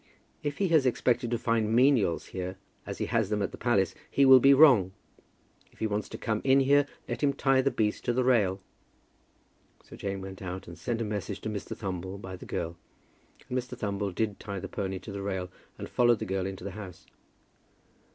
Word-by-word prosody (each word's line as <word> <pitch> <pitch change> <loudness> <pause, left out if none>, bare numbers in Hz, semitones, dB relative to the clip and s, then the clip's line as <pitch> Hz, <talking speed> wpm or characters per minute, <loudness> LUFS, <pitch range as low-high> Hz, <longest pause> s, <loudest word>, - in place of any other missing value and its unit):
"If 145 -1 -3
he 195 -3 +1
has 155 -5 +4
expected 120 -1 +1
to 120 - 0
find 115 -1 0
menials 120 - +3
here, 95 0 -4 0.3
as - - -5
he - - -2
has 115 -4 0
them 105 -1 0
at - - -2
the - - -7
palace, 95 -7 +2 0.2
he 140 - +3
will 130 -1 +9
be 135 +2 +6
wrong. 130 -11 +6 0.8
If - - -25
he - - -2
wants 105 -1 -2
to - - -7
come 110 -1 -2
in 135 0 +5
here, 140 +1 +4 0.2
let - - -4
him 140 -2 +3
tie 135 -1 +3
the 140 - +2
beast 105 -5 -1
to - - +2
the 130 +1 +1
rail." 105 -7 +2 1.2
So - - -13
Jane 100 -1 -4
went 95 0 -8
out 95 0 -6
and 85 - -9
sent 115 +2 -3
a - - -1
message 105 -1 -4
to - - -4
Mr. 105 -2 -5
Thumble 95 -1 -5
by 95 -2 -7
the - - -11
girl, 85 0 -4 0.7
and 125 - -4
Mr. 125 -1 -3
Thumble 100 -1 -2
did 105 +2 -2
tie 100 -2 -6
the - - -6
pony 95 -1 -3
to 100 - -9
the 100 0 -5
rail, 95 -2 -3 0.3
and - - -6
followed 120 -1 +3
the - - -4
girl 95 0 -2
into 95 -2 -7
the 100 - -5
house. 95 -4 -10
105 Hz, 215 wpm, -29 LUFS, 95-125 Hz, 1.2 s, will